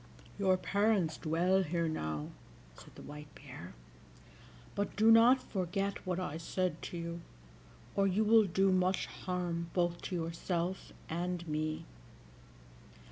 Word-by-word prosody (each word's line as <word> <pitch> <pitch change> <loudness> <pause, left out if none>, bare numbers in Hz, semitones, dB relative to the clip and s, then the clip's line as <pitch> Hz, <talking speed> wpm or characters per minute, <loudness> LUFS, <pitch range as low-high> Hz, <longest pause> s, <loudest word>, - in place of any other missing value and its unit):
"Your 190 -2 +4
parents 200 -4 +1
dwell 175 +4 +2
here 170 -1 0
now," 80 - -3 0.5
said - - -15
the - - -11
White 150 0 -9
Bear; 130 - -10 1.0
"but 200 0 -2
do 220 +2 +6
not 235 +3 +7
forget 195 0 -3
what 180 0 0
I 160 -4 -3
said 180 -1 -2
to 175 - -6
you, 170 0 -5 0.7
or 195 0 +3
you 195 +3 +2
will 220 0 +6
do 190 +2 +3
much 185 0 +2
harm 175 -2 -3
both 175 -1 +1
to 185 - -4
yourself 170 +2 -2 0.2
and 175 +1 -3
me." 155 0 -2
180 Hz, 135 wpm, -33 LUFS, 165-195 Hz, 1.0 s, not